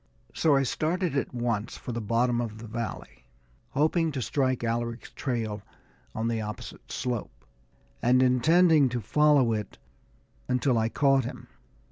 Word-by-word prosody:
So 155 -3 +3
I 135 - +3
started 160 +5 -1
at 140 - -1
once 120 -3 -2
for - - -7
the 120 0 -3
bottom 120 +3 +1
of 110 -2 -5
the 115 - -9
valley, 115 - -6 0.4
hoping 160 +2 +1
to 135 - -2
strike 130 +2 0
Alaric's 115 +1 -3
trail 115 -6 -3 0.5
on 110 +1 -1
the 115 -1 -1
opposite 105 0 -8
slope, 125 -4 -4 0.6
and 125 +2 +4
intending 155 +3 +4
to 120 0 -2
follow 145 0 +3
it 105 -2 -4 0.7
until 125 -1 +2
I 110 0 +1
caught 135 -1 +3
him. 125 - -8
125 Hz, 145 wpm, -27 LUFS, 115-140 Hz, 0.7 s, and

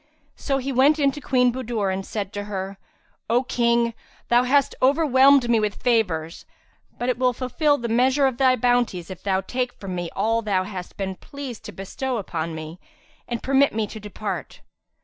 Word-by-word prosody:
So 275 -2 -1
he 270 +1 -3
went 275 +4 +4
in 280 -2 +3
to 295 - -9
Queen 250 -3 +2
Budur 230 -6 -2
and 190 +1 -3
said 200 0 -5
to 205 0 -4
her, 195 -1 -5 0.5
"O 240 +3 +3
King, 235 -1 +1 0.4
thou 240 0 +5
hast 275 +1 +3
overwhelmed 275 -2 +5
me 235 -1 +3
with 210 -1 -1
favours, 180 -10 -1 0.5
but 245 - -3
it 250 -1 0
will 250 -1 +3
fulfil 285 +4 +1
the 235 - -4
measure 260 +4 +3
of 260 -3 0
thy 260 -1 +4
bounties 240 -7 0
if 185 -1 -9
thou 190 -1 0
take 250 +5 -3
from 195 -2 -7
me 175 -1 -3
all 225 +3 +1
thou 200 -4 0
hast 185 -2 -8
been 190 -1 -3
pleased 275 -5 -8
to - - -6
bestow 250 +6 -4
upon 165 -5 -4
me, 160 +2 -8 0.5
and 240 -1 -4
permit 275 -2 +3
me 220 -1 +1
to 220 +2 -9
depart." 210 0 -6
235 Hz, 190 wpm, -23 LUFS, 195-260 Hz, 0.5 s, thou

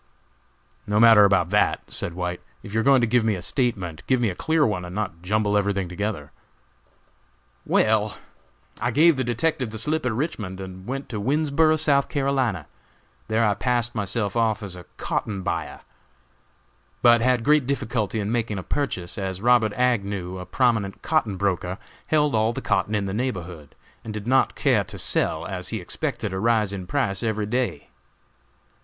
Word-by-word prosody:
"No 105 0 +1
matter 110 -3 +8
about 95 -3 +2
that," 105 - +1
said 85 - -3
White; 90 0 -3 0.2
"if 100 - -9
you 110 - +1
are - - +1
going 135 -1 +5
to - - +3
give 120 +1 +2
me 110 -2 +1
a 90 - -6
statement, 95 - -2
give 130 -1 +3
me 120 -3 +1
a - - -3
clear 160 - +2
one, 100 -6 -1
and 90 +1 -8
not 95 -6 -3
jumble 105 +2 0
everything 100 -2 0
together." 90 -4 -4 1.4
"Well, 110 -1 +2 0.6
I 120 - 0
gave 155 +6 +5
the 130 - -1
detective 130 +2 -1
the 110 - -6
slip 155 +8 -1
at 125 - 0
Richmond, 110 - -3
and 95 0 -9
went 135 +2 -4
to 110 - -4
Winnsboro, 155 +5 +2
S. 155 0 +3
C. 135 - +1 0.6
There 110 +1 +2
I 105 - +3
passed 120 +2 0
myself 100 0 -2
off 115 -2 +1
as 95 -3 -5
a 90 -2 -11
cotton 100 -3 -3
buyer, 85 -4 -3 1.2
but 120 -1 +6
had 125 -1 +2
great 150 -2 +3
difficulty 115 -6 -1
in 105 +1 -2
making 115 -3 -1
a 95 - -5
purchase, 95 - -3
as 95 -1 -3
Robert 115 -1 +3
Agnew, 100 -7 -1
a 90 - -8
prominent 110 -6 0
cotton 115 -12 0
broker, 90 -1 -1 0.3
held 150 -2 +2
all 110 +1 +2
the - - -4
cotton 105 - 0
in 100 -1 0
the 95 - -3
neighborhood, 90 - -4 0.3
and 110 -1 -6
did 105 -1 -5
not 130 +2 +2
care 125 -8 +2
to 100 +1 -10
sell 80 -2 0
as 95 -1 -4
he 110 - -3
expected 115 - -4
a 95 - -2
rise 110 -2 +2
in 95 -2 -6
price 100 -6 -1
every 110 -2 -1
day. 110 - -2
110 Hz, 180 wpm, -24 LUFS, 95-125 Hz, 1.4 s, matter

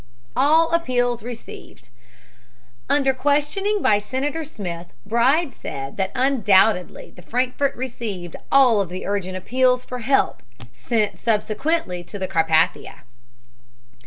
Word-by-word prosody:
ALL 315 +6 +4
APPEALS 245 -7 +1
RECEIVED 235 - -10 1.0
Under 270 -2 +3
questioning 295 +10 0
by 205 - +4
Senator 270 +9 -3
Smith, 180 - -7 0.2
Bride 265 +7 +2
said 135 0 -7
that 190 -1 -1
undoubtedly 220 -7 +2
the 180 - -15
Frankfurt 255 +7 -1
received 220 -9 -5 0.2
all 250 -6 +5
of 190 - -3
the 185 +1 -6
urgent 190 -2 -2
appeals 250 +5 +1
for 250 - -6
help 270 +4 +1 0.3
sent 210 - -1
subsequently 215 - -1
to 205 - -8
the 190 -1 -3
Carpathia. 160 -3 +1
240 Hz, 115 wpm, -22 LUFS, 190-270 Hz, 1.0 s, all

